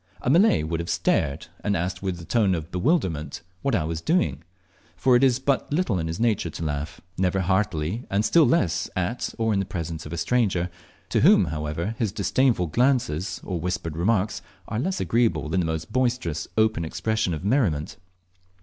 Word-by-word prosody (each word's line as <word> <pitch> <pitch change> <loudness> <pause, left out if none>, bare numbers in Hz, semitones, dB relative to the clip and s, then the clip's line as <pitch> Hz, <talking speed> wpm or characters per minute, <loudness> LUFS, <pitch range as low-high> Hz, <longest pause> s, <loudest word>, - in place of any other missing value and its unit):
A 125 - +2
Malay 175 - +5
would 80 +1 -2
have 85 +1 -4
stared, 80 -4 0 0.2
and 100 -2 +1
asked 90 +2 -3
with 95 -3 -3
a 85 - -9
tone 105 -4 +2
of 80 +1 -6
bewilderment 90 - 0 0.2
what 135 -4 +1
I 90 - +1
was 80 +1 -3
doing, 80 - +1 0.5
for 125 +8 +3
it 120 - +4
is 130 -2 +4
but 135 +1 -1
little 145 - +1
in 80 - -2
his 80 +4 -4
nature 110 -7 +1
to 80 - -6
laugh, 75 +2 -4 0.2
never 95 +1 +1
heartily, 95 +2 -1
and 100 +2 +1
still 165 -3 +5
less 95 - +1
at 95 +7 -2
or 115 -1 +1
in 100 - +1
the - - +1
presence 80 -4 -5
of - - -10
a 85 - -4
stranger, 95 -4 +1 0.4
to - - +2
whom, - - +6
however, 75 +6 -3
his 110 -5 0
disdainful 120 -2 +1
glances 105 - 0
or 90 -3 -3
whispered 80 -2 -3
remarks 100 +4 0 0.3
are 110 - -2
less 185 +8 -1
agreeable 110 -10 +1
than 95 - +1
the 85 - 0
most 80 0 -4
boisterous 125 -11 0
open 110 -6 +2
expression 110 +2 -1
of 80 - -7
merriment. 100 - +1
95 Hz, 190 wpm, -25 LUFS, 80-115 Hz, 0.5 s, whom